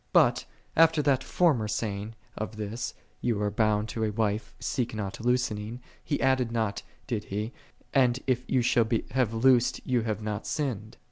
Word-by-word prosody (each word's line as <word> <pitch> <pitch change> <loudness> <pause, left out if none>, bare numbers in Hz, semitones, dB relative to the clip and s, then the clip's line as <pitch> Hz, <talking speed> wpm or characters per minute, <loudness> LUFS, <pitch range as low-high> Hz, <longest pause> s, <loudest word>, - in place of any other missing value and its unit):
"7 - - -40
But, - - +4 0.3
after 160 -1 +5
that 135 -2 +2
former 145 -12 +2
saying 105 0 -3 0.2
of 110 +1 -4
his, 110 +2 -4 0.3
"Thou 115 -4 +1
art 105 0 -1
bound 105 -1 +2
to 110 - -2
a 110 - +1
wife, 105 0 -1
seek 120 -3 -2
not 105 +1 -4
loosening," 120 -2 0 0.2
he 145 - -1
added 130 -3 +2
not, 110 -3 -1 0.2
did 115 -6 -3
he, 105 +5 -3 0.4
"And 125 -2 +4
if 125 -1 0
thou 130 - +2
shall 115 -1 +3 0.2
have 125 -4 +1
loosed, 125 +1 +4
thou 125 -2 +2
hast 110 -1 -2
not 105 -1 -3
sinned 120 -7 -3
115 Hz, 175 wpm, -28 LUFS, 105-125 Hz, 0.4 s, after